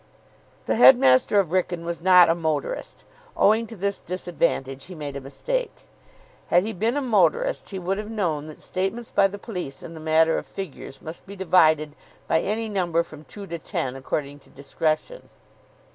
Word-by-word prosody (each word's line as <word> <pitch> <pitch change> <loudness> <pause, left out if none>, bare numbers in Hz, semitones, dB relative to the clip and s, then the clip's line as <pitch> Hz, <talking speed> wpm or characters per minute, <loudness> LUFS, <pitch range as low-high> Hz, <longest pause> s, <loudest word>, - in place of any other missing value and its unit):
The - - 0
headmaster 205 - +6
of 190 -5 +1
Wrykyn 175 -2 -1
was 170 -1 -4
not 180 -1 +7
a 165 - +4
motorist. 165 - -3 0.3
Owing 220 +3 +3
to 225 - -9
this 200 0 -2
disadvantage 170 -7 -2
he 185 - -10
made 145 -3 -6
a 140 - -5
mistake. - - -4 0.6
Had 175 +1 +4
he 220 - -3
been 225 +8 0
a 290 - -1
motorist, 470 - +1
he 195 - -5
would 190 +2 -2
have 210 0 -6
known 165 -9 -2
that 155 - -11
statements 195 +6 -3
by 200 -1 +4
the 200 +1 -8
police 180 - -6
in 165 - -9
the 160 - -9
matter 160 +1 +3
of - - -11
figures 175 -7 -8
must 160 +4 -9
be 200 - -9
divided 160 -5 +3 0.3
by - - +3
any 220 +3 -2
number 175 -5 0
from 155 -2 -13
two 205 -1 -9
to 170 -3 -6
ten, 130 -4 -3
according 140 +2 -4
to - - -23
discretion. 155 - -3
180 Hz, 180 wpm, -24 LUFS, 155-205 Hz, 0.6 s, not